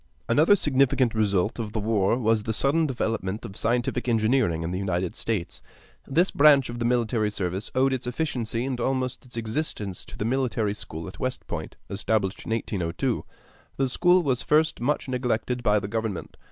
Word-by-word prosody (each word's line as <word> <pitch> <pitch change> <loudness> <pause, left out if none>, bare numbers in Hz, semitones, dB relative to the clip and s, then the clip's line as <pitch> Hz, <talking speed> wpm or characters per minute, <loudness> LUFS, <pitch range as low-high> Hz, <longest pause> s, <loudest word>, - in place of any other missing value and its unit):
Another 155 - +5
significant 135 - +2
result 105 -1 +1
of 110 -2 -4
the 110 - -1
war 105 0 +2
was 110 -3 +2
the 110 +1 -2
sudden 155 +7 +2
development 110 -5 -2
of 95 - -8
scientific 120 +2 0
engineering 110 -7 +2
in 85 - -3
the 90 - -2
United 90 -2 -1
States. 105 -7 -3 0.5
This 170 +7 +2
branch 140 -3 +5
of 120 - -6
the 120 - -1
military 115 -3 +1
service 95 0 -3
owed 135 +1 +3
its 130 -1 -3
efficiency 125 -4 -2
and 130 -2 -3
almost 130 0 -2
its 120 - -11
existence 110 - -3
to - - -11
the 105 - -2
military 115 -4 0
school 80 -5 -7
at 95 - -10
West 130 0 -3
Point, - - -5
established 100 -1 -1
in - - -6
1802. 110 +1 -1 0.5
The 135 - +2
school 175 +7 +4
was 130 -4 0
at - - -12
first 155 +1 +3
much 140 +4 0
neglected 125 -1 -1
by 105 -3 +3
government. 105 -2 -3
115 Hz, 180 wpm, -26 LUFS, 105-130 Hz, 0.5 s, Another